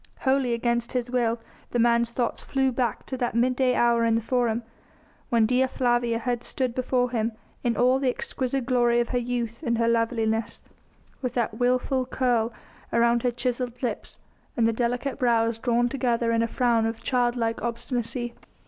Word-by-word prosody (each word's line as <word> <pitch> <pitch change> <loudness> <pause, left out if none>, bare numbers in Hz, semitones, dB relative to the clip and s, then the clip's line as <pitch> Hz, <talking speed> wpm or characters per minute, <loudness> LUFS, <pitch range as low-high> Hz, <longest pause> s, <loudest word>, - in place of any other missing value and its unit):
Wholly 265 -3 +2
against 235 0 -1
his 250 -1 -2
will, 235 -2 +1 0.3
the - - -1
man's 235 0 +3
thoughts 240 0 -2
flew 265 -1 +1
back 240 -2 -1
to 260 - -4
that 240 -2 -2
midday 250 +1 +2
hour 235 -1 +3
in 230 -1 +3
the - - +2
Forum, 235 0 0 0.7
when 230 -2 +4
Dea 255 +3 +2
Flavia 240 -2 +1
had 240 0 -2
stood 255 -3 -2
before 250 -1 0
him 230 -1 -1 0.3
in 240 -2 0
all 255 +2 +4
the 265 -2 +1
exquisite 255 +1 -2
glory 240 -2 +3
of 240 - 0
her 250 - +1
youth 235 -1 -3
and 235 -6 0
her 230 0 +2
loveliness, 225 -1 0 0.6
with 250 -2 -3
that 230 -2 -1
wilful 255 +1 +1
curl 240 -3 +1 0.4
round 235 0 +3
her 245 - +2
chiselled 245 0 -3
lips 230 -4 -3 0.4
and 230 -1 +4
the 230 - +1
delicate 245 +4 -1
brows 230 -2 +2
drawn 240 0 +2
together 240 -2 0
in 230 0 +2
a 230 - +1
frown 230 -2 +2
of 225 0 -5
child 245 -2 +1
like 230 -1 -1
obstinacy. 240 0 -3
240 Hz, 175 wpm, -26 LUFS, 230-250 Hz, 0.7 s, when